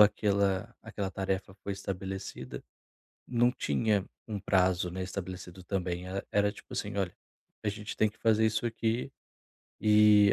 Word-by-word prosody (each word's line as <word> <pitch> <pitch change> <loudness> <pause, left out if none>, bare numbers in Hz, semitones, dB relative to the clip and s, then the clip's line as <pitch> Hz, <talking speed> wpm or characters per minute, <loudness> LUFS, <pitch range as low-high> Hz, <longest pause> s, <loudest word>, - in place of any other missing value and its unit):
aquela 100 -2 +4
aquela 95 -2 -4
tarefa 95 0 -2
foi 100 - -1
estabelecida, 95 0 -5 0.6
não 120 0 +3
tinha 100 - +1 0.2
um 105 -3 -3
prazo, 90 -2 +3
né, 95 +1 -3
estabelecido 90 -1 -6
também. 90 -2 -2
E 95 +1 -3
era 105 0 +3
tipo 105 - -13
assim: - - -3
"Olha, 95 -3 0 0.5
a 105 - 0
gente 105 +1 -4
tem 110 - +3
que 110 - -14
fazer 110 0 +4
isso 110 +1 0
aqui 115 +2 0 0.7
e 105 -1 +7
100 Hz, 145 wpm, -31 LUFS, 95-105 Hz, 0.7 s, e